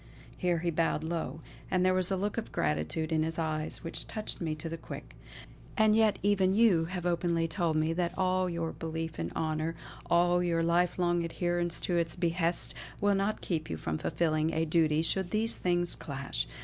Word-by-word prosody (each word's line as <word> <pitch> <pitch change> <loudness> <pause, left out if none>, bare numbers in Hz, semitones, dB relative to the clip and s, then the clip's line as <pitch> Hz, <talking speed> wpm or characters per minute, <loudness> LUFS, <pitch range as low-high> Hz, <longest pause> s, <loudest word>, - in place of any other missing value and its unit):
Here 180 -1 +1
he 170 +1 -1
bowed 165 -1 +1
low, 160 -2 -3 0.3
and 185 0 +2
there 185 - +4
was 185 -1 +2
a 190 - 0
look 205 +2 -1
of 225 - -8
gratitude 75 - -1
in 160 -1 +2
his 160 +1 -2
eyes 155 0 -2
which 165 - -4
touched 215 -3 -5
me 160 -2 -1
to 155 +2 -6
the 165 - -3
quick. 160 - -9 0.6
"And 215 -1 +5
yet 220 -2 +4
even 195 -2 +3
you 205 -8 +5
have 180 0 -5
openly 170 -1 +1
told 165 -1 0
me 155 +1 +2
that 175 +1 -1
all 185 0 +2
your 170 -1 -2
belief 160 - -5
in 85 +1 -2
honour, 155 +1 -1 0.3
all 175 +1 +4
your 170 -2 +1
life 170 +1 +2
long 175 -1 +2
adherence 175 0 -1
to 175 - 0
its 165 -1 0
behests, 170 -1 0 0.3
will 205 0 +3
not 200 +2 0
keep 160 -4 -2
you 80 - -3
from 80 0 -3
fulfilling 155 -1 +1
a 160 +1 +2
duty 160 -1 +2
should 185 +2 +2
these 220 +3 +1
things 175 -1 +1
clash. 140 - -4
170 Hz, 195 wpm, -30 LUFS, 160-180 Hz, 0.6 s, And